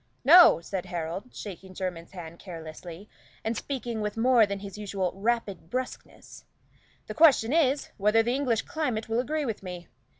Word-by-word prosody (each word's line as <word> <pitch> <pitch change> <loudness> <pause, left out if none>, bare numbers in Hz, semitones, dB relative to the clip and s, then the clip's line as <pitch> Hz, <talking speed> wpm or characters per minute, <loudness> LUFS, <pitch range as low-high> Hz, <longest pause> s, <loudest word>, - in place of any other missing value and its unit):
"No," 330 - +8
said 185 +1 -5
Harold, 175 +5 -5
shaking 190 -2 -9
Jermyn's 175 -3 -5
hand 170 -2 -9
carelessly, 170 +1 -9 0.4
and 225 +1 -1
speaking 235 -3 -4
with 210 +1 -3
more 235 -2 +5
than 200 0 -3
his 195 0 -9
usual 195 -3 -2
brusqueness, 210 +1 -4 0.6
"the - - -6
question 290 -6 +5
is, 290 -3 +2
whether 210 +2 +3
the 240 +2 0
English 255 -5 0
climate 290 -10 -3
will 225 +1 0
agree 300 +4 -1
with 225 -4 -4
me. 180 -2 -8
210 Hz, 155 wpm, -27 LUFS, 185-250 Hz, 0.6 s, No